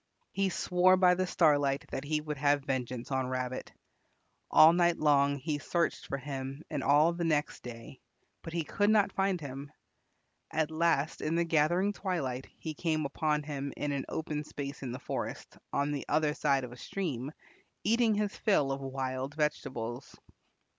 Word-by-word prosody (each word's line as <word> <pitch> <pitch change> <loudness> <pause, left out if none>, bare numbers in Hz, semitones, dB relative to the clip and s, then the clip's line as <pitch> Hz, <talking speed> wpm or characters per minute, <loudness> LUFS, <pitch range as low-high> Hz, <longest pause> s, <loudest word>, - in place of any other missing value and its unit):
He 195 0 +1
swore 185 +1 +3
by 180 -1 +6
the 185 +1 0
Starlight 145 -5 +3
that 135 - -3
he 150 +1 -1
would 150 -1 -5
have 145 0 +3
vengeance 130 -2 -3
on 130 -1 0
Rabbit. 130 0 -3 0.8
All 160 +2 +8
night 175 -1 +3
long 140 -2 +3
he 145 +2 -2
searched 170 +3 -1
for 140 - -2
him 135 +1 -6
and 145 -3 -1
all 150 +4 +5
the 170 0 -3
next 150 -3 0
day, 120 +2 -9 0.4
but 165 - -8
he 170 0 -1
could 205 +6 +1
not 210 -2 +4
find 195 -2 +1
him. 140 -1 -7 0.8
At 155 0 0
last 160 -2 +1
in 155 +2 0
the 170 0 +2
gathering 170 +5 +2
twilight 140 -11 -3
he 160 - -5
came 155 -1 -1
upon 150 +1 0
him 140 -1 -4
in 145 - -1
an 140 -2 -2
open 150 -1 -3
space 140 -1 -6
in 130 -3 -4
the 125 - -4
forest, 130 - -5 0.2
on 140 +1 0
the 145 -2 -2
other 150 0 +2
side 140 -3 +1
of 125 - -6
a 120 - -11
stream, 145 -6 -4 0.5
eating 230 -1 +3
his 210 -1 -1
fill 150 -10 +2
of 135 0 -3
wild 135 +1 -3
vegetables. 135 -5 -3
150 Hz, 175 wpm, -31 LUFS, 135-170 Hz, 0.8 s, All